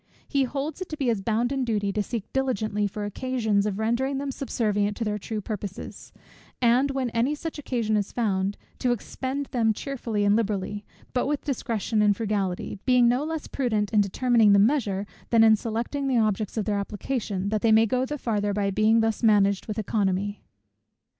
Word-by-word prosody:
He 275 -2 +1
holds 280 +6 -4
it 370 - -5
to 310 - -5
be 270 -5 0
his 220 -4 0
bounden 240 +6 0
duty 205 -4 -1
to 210 - 0
seek 220 0 -3
diligently 215 -6 0
for 205 +1 -5
occasions 220 -2 0
of 200 -2 -2
rendering 240 +5 0
them 275 0 -3
subservient 210 -6 -1
to 235 - -2
their 210 -1 -2
true 215 +1 -4
purposes; 205 -2 -7 0.5
and 250 +3 +3
when 265 -3 -2
any 240 +6 +1
such 320 0 -6
occasion 235 -6 -1
is 205 -1 -1
found, 200 -4 0 0.2
to 250 -1 +2
expend 265 +4 -4
them 225 -3 +2
cheerfully 230 -5 -2
and 205 +1 +4
liberally, 205 -2 -1 0.3
but 250 - +1
with 295 0 -1
discretion 230 -5 -1
and 205 -1 +3
frugality; 200 -4 -2
being 250 -2 +4
no 250 +4 +2
less 315 0 -4
prudent 220 -6 -1
in 210 - +5
determining 220 +1 +3
the - - +6
measure, 205 -3 +2 0.2
than 230 -1 +5
in 220 -1 +7
selecting 235 +6 -3
the 260 -2 +2
objects 215 -1 0
of 215 - 0
their 205 -2 0
application, 205 -1 -3
that 215 0 0
they 225 - +3
may 220 +1 +6
go 250 +3 0
the 295 +3 -3
farther 205 -5 -1
by 200 -1 0
being 215 +3 +3
thus 225 -1 0
managed 200 -3 +3
with 215 -1 -4
oeconomy. 205 -1 -1
220 Hz, 190 wpm, -26 LUFS, 205-255 Hz, 0.5 s, in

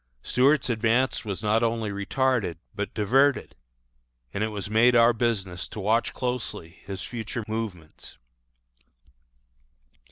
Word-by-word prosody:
Stuart's 135 +3 +3
advance 120 +2 +1
was 100 -2 -5
not 110 +2 +2
only 115 -2 0
retarded, 105 -1 0 0.2
but 100 0 -4
diverted; 130 +7 +2 0.8
and 100 - -1
it - - +1
was 105 -2 -5
made 115 +3 +4
our 120 0 +6
business 100 -6 -2
to - - -8
watch 110 +4 +1
closely 125 -9 -4
his 100 -1 -5
future 115 -1 -5
movements. 105 -8 -6
110 Hz, 120 wpm, -26 LUFS, 100-120 Hz, 0.8 s, our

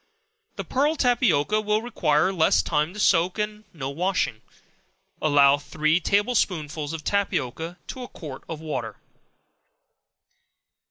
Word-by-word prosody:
The - - -4
pearl 290 +4 +1
tapioca 215 - +2
will 210 +1 0
require 185 -7 +1
less 165 -4 +3
time 150 +1 0
to - - -7
soak, 180 -1 +3
and 210 0 -3
no 135 -4 -5
washing. 160 - -1 0.8
Allow 145 -2 +5
three 155 +3 +1
table 205 +7 +1
spoonsful 155 -8 -1
of 165 -2 -6
tapioca 170 -4 -2
to 260 - -7
a 250 - -6
quart 145 - -9
of 160 -2 -5
water. 145 -8 -4
165 Hz, 125 wpm, -25 LUFS, 150-210 Hz, 0.8 s, Allow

